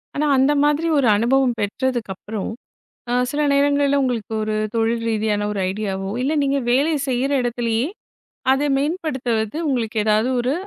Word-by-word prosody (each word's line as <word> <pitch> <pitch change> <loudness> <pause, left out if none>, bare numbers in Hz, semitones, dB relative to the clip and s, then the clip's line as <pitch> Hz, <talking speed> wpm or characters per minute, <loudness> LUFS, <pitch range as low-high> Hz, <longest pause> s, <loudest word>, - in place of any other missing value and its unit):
ஆனால், 290 0 +2
அந்த 270 +2 +4
மாதிரி 295 +3 +2
ஒரு 255 - +2
அனுபவம் 245 +3 +2
பெற்றதற்கு 235 +1 -2
அப்பறம், 210 +2 -5 0.6
அ - - 0 0.2
சில 295 - -1
நேரங்களில் 285 0 +3
உங்களுக்கு 240 -5 -2
ஒரு 215 0 -2 0.2
தொழில் 230 +1 0
ரீதியான 210 -1 0
ஒரு 205 - -3
ஐடியா 200 -1 -3
வோ 195 - -4
இல்லை, 295 +4 0
நீங்கள் 275 -2 0
வேலை 285 +6 +2
செய்கிற 265 +2 0
இடத்திலேயே 240 +1 -1 0.7
அதை 275 +2 +1
மேம்படுத்துவது, 270 - -2
உங்களுக்கு 235 -4 -1
ஏதாவது 215 +2 +2
ஒரு 250 +2 0
245 Hz, 150 wpm, -21 LUFS, 220-280 Hz, 0.7 s, அந்த